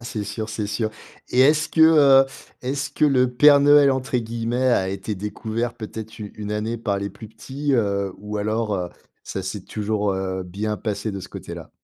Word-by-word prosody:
c'est 110 -3 -4
sûr, 110 +2 -5
c'est 110 -1 -3
sûr. 110 +1 -2 0.4
Et 125 - +2
est-ce 150 +3 +4
que, 160 - -1
heu, 145 -4 +7 0.4
est-ce 140 +3 -2
que - - +1
le 130 -3 +3
Père 145 +2 +7
Noël, 145 -1 +6
entre 130 -1 -1
guillemets, 115 +2 -1
a 95 -6 +2
été 100 +2 -4
«découvert» 110 +4 -4
peut-être 110 -1 -8
u 105 -2 -7
une 105 0 -5
année 110 +2 -2
par 100 -3 -1
les 100 0 -4
plus 110 +2 -11
petits, 140 +5 -3
heu, 100 -4 0
ou 105 +1 -6
alors, 110 +1 -1
heu, 90 -1 -3 0.4
ça 95 - -5
s'est 95 +1 -5
toujours, 105 -1 -1
heu, 95 -1 -3
bien 105 +4 -3
passé 105 +1 -3
de 100 -1 -5
ce 95 - -9
côté-là? - - -9
110 Hz, 200 wpm, -23 LUFS, 100-130 Hz, 0.4 s, heu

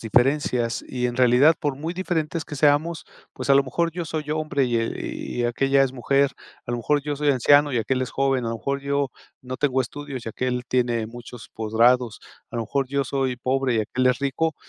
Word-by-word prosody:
diferencias, 120 0 +1
y 125 -1 -3
en 120 - -3
realidad, 130 +5 +5
por 145 -3 -1
muy 160 +4 -4
diferentes 165 -4 -2
que 150 - -7
seamos, 150 +3 +2 0.3
pues, - - -3
a - - +7
lo 140 - +6
mejor 165 +6 -1
yo 175 0 -4
soy 150 -1 -4
hombre 155 -3 0
y 120 -2 0
e 115 0 -3 0.3
y - - +1
aquella 135 +3 +2
es 135 -1 0
mujer. 135 +2 +1 0.3
A - - -4
lo 120 - -1
mejor 145 +5 +1
yo 145 0 -3
soy 150 +1 0
anciano 145 +2 +5
y 130 - -1
aquél 130 +4 0
es 130 - -2
joven. 135 -3 0
A - - -1
lo 115 - -2
mejor 140 +4 -2
yo 140 0 0 0.3
no 130 0 -6
tengo 135 -3 +2
estudios 140 -1 -7
y - - -4
aquél 125 +2 -2
tiene 120 -3 0
muchos 120 0 -11
posgrados. 115 +1 +2 0.3
A - - -6
lo 115 - -1
mejor 135 +5 -1
yo 140 +1 0
soy 130 -1 -1
pobre 130 0 0
y 110 - +2
aquél 125 +4 -1
es 125 -1 +3
rico. 145 +4 0
135 Hz, 220 wpm, -24 LUFS, 120-145 Hz, 0.3 s, a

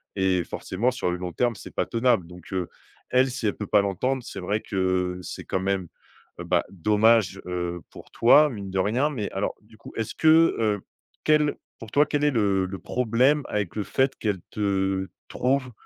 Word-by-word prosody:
et 95 -2 +1
forcément 110 +10 -2
sur 125 -8 -2
le 90 - -2
long 90 -1 -5
terme 120 +6 +1
c'est 95 - -11
pas - - +1
tenable, 115 -6 +1
donc 90 +2 -12
heu, 90 -2 -2 0.4
elle, 130 +1 +3
si 115 - -2
elle 105 - 0
peut 105 - -5
pas 105 - +4
l'entendre, 125 +7 -1
c'est 100 - -7
vrai 105 +4 -1
que, 95 -2 -1
c'est - - -7
quand 95 - -1
même, 95 -2 -1 0.5
heu, - - -4
bah, - - +1
dommage, 105 +1 +3
heu, 90 -1 -3
pour - - -14
toi 150 +6 +6
mine 100 -5 -6
de 95 - -3
rien, 120 +10 +1
mais 115 -9 -4
alors 95 +1 -2
du 110 +1 -20
coup - - -12
est-ce 110 -2 -3
que, 160 - 0 0.3
heu, 105 -3 +1 0.4
quel 150 -1 +3 0.2
pour 110 -2 -10
toi 145 +4 +4
quel 145 0 -1
est 150 - +4
le, 100 -5 +2
heu, - - 0
le 95 0 -6
problème 125 +5 +2
avec 100 -5 -2
le 105 - -1
fait 130 +7 0
qu'elle 105 -4 -1
te, 95 -2 0 0.2
trouve, 130 0 0
105 Hz, 205 wpm, -25 LUFS, 95-125 Hz, 0.5 s, toi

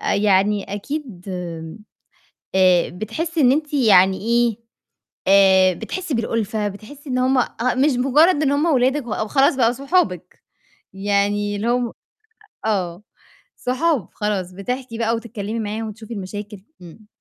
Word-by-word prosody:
يعني 200 0 +2
أكيد 230 - -6
آمم، 170 0 -6 0.8
آآ 185 -2 +4
بتحسّي 305 - -3
إن 255 -2 +5
أنتِ 300 +1 -1
يعني 195 -8 +5
إيه، 235 0 +1 0.7
آآ 190 -1 +5
بتحسّي 360 - -5
بالألفة، 220 -2 -1
بتحسّي 260 +8 -11
إن 255 - 0
هُم 255 +1 +2 0.5
مش 300 - +3
مجرّد 295 +6 +4
إن 280 - +2
هُم 290 +3 +1
ولادِك 265 -2 +2
و 225 - -5
أو 215 - -2
خلاص 275 +2 +3
بقوا 235 -3 +3
صحابِك، 250 - -1 0.5
يعني 205 +1 0
اللي 210 +3 -2
هُم 240 -1 0 0.7
آه، 185 -4 -1 0.5
صحاب 260 - 0
خلاص 200 -4 -2
بتحكي 235 +5 -5
بقى 230 0 +1
وتتكلّمي 225 -1 -5
معاهم 220 +1 -4
وتشوفي 220 +2 -9
المشاكل. 205 0 -7 0.2
إمم. 180 +5 -14
220 Hz, 135 wpm, -21 LUFS, 195-260 Hz, 0.8 s, إن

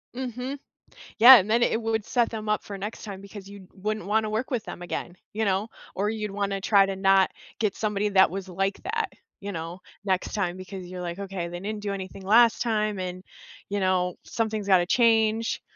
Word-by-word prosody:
Mhm. 255 +2 -4 0.6
Yeah, 255 +4 +11
and 210 -2 +1
then 235 +2 +3
it 230 - +2
would 225 -2 -1
set 240 -1 +1
them 215 -2 -5
up 210 - +1
for 200 - -7
next 205 +4 -6
time 195 -2 -7
because 200 0 -10
you 200 -2 -12
wouldn't 215 +1 -4
want 220 +2 +2
to 215 - -3
work 220 +4 -2
with 245 -5 -2
them 175 - -8
again, 175 0 -5 0.2
you 220 +1 -1
know? 200 +2 0 0.3
Or 205 +2 0
you'd 215 -2 -3
want 200 0 -2
to 195 - -2
try 200 -1 +4
to 195 -1 -3
not 195 0 +4 0.3
get 210 -3 0
somebody 210 -1 -1
that 190 -1 +5
was 190 0 -5
like 195 +2 -2
that, 440 0 -2 0.3
you 200 0 -5
know? 165 +1 -6 0.2
Next 190 -2 -1
time 185 -4 -1
because 185 0 -8
you're 180 0 -7
like, 175 +1 -5
"Okay, 195 -3 -4
they 175 0 -7
didn't 210 +1 -5
do 200 -1 -2
anything 190 0 -7
last 225 +4 +5
time 215 -3 0
and, 185 0 -5 0.5
you 205 - -1
know, 185 -1 +1
something's 220 -3 -2
gotta 180 -3 +5
change." 225 0 +2
200 Hz, 215 wpm, -26 LUFS, 190-220 Hz, 0.6 s, Yeah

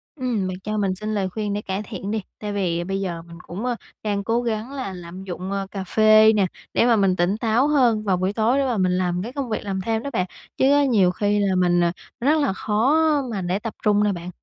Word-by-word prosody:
Ừm, 245 -9 -1
bạn 185 0 -5
cho 215 +1 -2
mình 195 -3 0
xin 215 +3 -4
lời 195 -3 -1
khuyên 205 +1 -3
để 205 - -2
cải 195 0 -3
thiện 200 -2 -6
đi. 220 0 -1 0.2
Tại 210 -1 -4
vì 175 -4 -1
bây 195 +2 -3
giờ 175 -3 -3
mình 170 0 -13
cũng, 195 +7 -5
ơ, 250 -1 0 0.3
đang 205 -2 -1
cố 230 +4 +1
gắng 230 +1 -3
là 260 -9 -4
lạm 180 +1 -9
dụng 185 0 -5 0.2
cà 195 -2 -4
phê 215 +2 +6
nè, 205 -3 +3 0.3
để - - +3
mà 240 -1 +5
mình 195 -3 +3
tỉnh 185 +3 +1
táo 230 +4 +2
hơn 250 -7 +3
vào 190 -3 +1
buổi 185 +2 -1
tối 230 +4 +2
để 280 - +2
mà 245 -4 0
mình 185 -2 +2
làm 180 -1 0
cái 240 +4 -7
công 275 -3 -3
việc 215 - -2
làm 195 -2 -3
thêm 225 +3 -1
đó 280 - -3
bạn. 185 -5 +1 0.3
Chứ - - +3 0.2
nhiều 195 -7 +4
khi 205 +2 0
là 195 -2 +1
mình, 175 -1 +3
à, 170 - +2 0.3
rất 285 +6 +3
là 280 - +1
khó 220 +8 +1 0.4
mà 200 -4 -3
để 180 +2 -1
tập 225 0 -5
trung 210 0 +3
nè 210 - +2
bạn. 175 -1 -6
205 Hz, 260 wpm, -23 LUFS, 185-225 Hz, 0.4 s, phê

